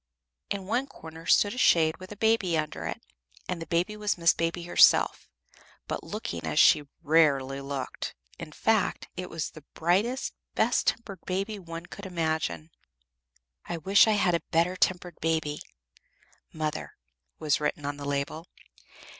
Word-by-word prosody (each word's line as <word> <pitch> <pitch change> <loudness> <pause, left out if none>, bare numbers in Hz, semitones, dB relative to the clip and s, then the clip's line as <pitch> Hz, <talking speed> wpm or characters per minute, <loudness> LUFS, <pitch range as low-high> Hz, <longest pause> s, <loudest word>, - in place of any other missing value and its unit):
In 195 -2 -3
one 240 +7 0
corner 160 - -11
stood 205 0 +4
a 250 - -5
shade 160 -8 +4
with 185 +1 -11
a - - -6
baby 210 -6 +2
under 155 -1 -3
it, - - -4 0.5
and 180 -2 -3
the 165 - -6
baby 175 +5 0
was 210 -2 -1
Miss 170 -1 +4
Baby 165 +1 -2
herself, 175 - +4 0.6
but - - -4
looking 85 -1 -5
as 80 -2 -3
she - - +7
very 145 -1 -14
rarely 140 -4 +3
looked; 140 -1 -5 0.2
in 155 - -7
fact, 220 +4 0
it 180 0 -5
was 165 -1 -4
the 155 - -13
brightest, 200 +10 +1 0.2
best - - +2
tempered 195 -6 -2
baby 195 +3 -2
one 165 -2 -8
could 200 +2 -9
imagine." 160 - -2 1.0
"I 170 - -2
wish 195 +7 +5
I 220 - +4
had 190 -4 +2
a 170 - +1
better 170 +2 +2
tempered 180 -2 0
baby. 160 -2 -1 0.9
Mother," 155 -1 -4 0.4
was 150 -2 0
written 150 -1 -2
on 145 0 -3
the 145 - -7
label. 145 +4 -3
165 Hz, 160 wpm, -28 LUFS, 155-190 Hz, 1.0 s, she